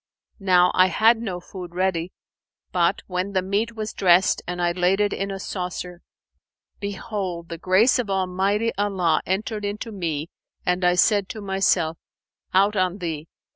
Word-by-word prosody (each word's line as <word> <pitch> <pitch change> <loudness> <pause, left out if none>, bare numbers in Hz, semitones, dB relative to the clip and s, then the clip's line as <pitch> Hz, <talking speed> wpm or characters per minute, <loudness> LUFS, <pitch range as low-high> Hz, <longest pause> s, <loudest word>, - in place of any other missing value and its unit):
Now 180 -2 +4
I 185 0 +5
had 225 +5 +4
no 190 -6 -4
food 175 -1 -9
ready; 180 -2 0 0.6
but, 175 +1 +1
when 185 +2 -3
the 185 -1 +1
meat 210 +5 -1
was 215 -1 -4
dressed 185 -1 +4
and 180 0 -4
I 175 0 +2
laid 180 +2 +1
it 205 -1 +2
in 195 +1 -3
a 195 0 -5
saucer, 180 -2 -5 0.8
behold, 195 -4 -4
the 170 -1 -6
grace 190 +9 +4
of 230 -5 -2
Almighty 195 +4 0
Allah 190 -6 +1
entered 210 +3 -2
into 205 +3 -4
me 165 -5 -3 0.4
and 180 +1 +1
I 180 0 +4
said 200 +2 +3
to 220 - -6
myself, 190 -4 +1 0.5
'Out 200 +3 +3
on 185 -1 +1
thee! 165 -4 -4
185 Hz, 160 wpm, -23 LUFS, 180-205 Hz, 0.8 s, I